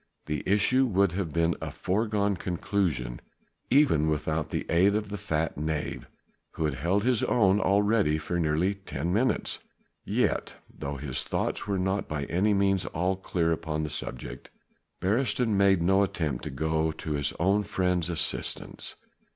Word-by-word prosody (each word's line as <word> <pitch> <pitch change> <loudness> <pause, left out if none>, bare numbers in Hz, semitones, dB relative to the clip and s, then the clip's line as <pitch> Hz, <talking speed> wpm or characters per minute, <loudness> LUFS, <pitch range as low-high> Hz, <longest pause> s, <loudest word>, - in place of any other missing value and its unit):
The 75 -1 -2
issue 115 +7 +3
would 100 -3 +2
have 90 -2 -3
been 85 +2 +1
a 80 - -3
foregone 100 +5 0
conclusion 85 -9 -2 0.5
even 130 - +4
without 75 0 -1
the - - -2
aid 95 +4 +4
of 105 -1 -2
the 105 - -4
fat 80 -7 -2
knave 75 0 -3 0.5
who 80 - -1
had 75 - 0
held 85 +10 0
his 125 -2 +2
own 100 -4 +3
already 100 -6 +3
for 85 +3 -2
nearly 80 +4 +1
ten 85 -4 -4
minutes. 125 +6 +1 0.4
Yet, - - 0 0.2
though 70 +1 -4
his 65 -1 -3
thoughts - - -2
were 100 -1 0
not 95 +2 -1
by 75 -2 -3
any 100 +8 +1
means 95 -1 +2
all 90 +4 0
clear 90 -3 -1
upon 80 -1 -2
the 75 - -3
subject, 65 -4 -6 0.5
Beresteyn 110 +2 +1
made 95 -3 +4
no 95 +3 +4
attempt 85 -7 -1
to - - -3
go 80 0 0
to 80 0 -6
his 75 -1 +1
own 100 +5 +3
friend's 90 -4 0
assistance. 85 -3 -1
90 Hz, 160 wpm, -28 LUFS, 80-100 Hz, 0.5 s, even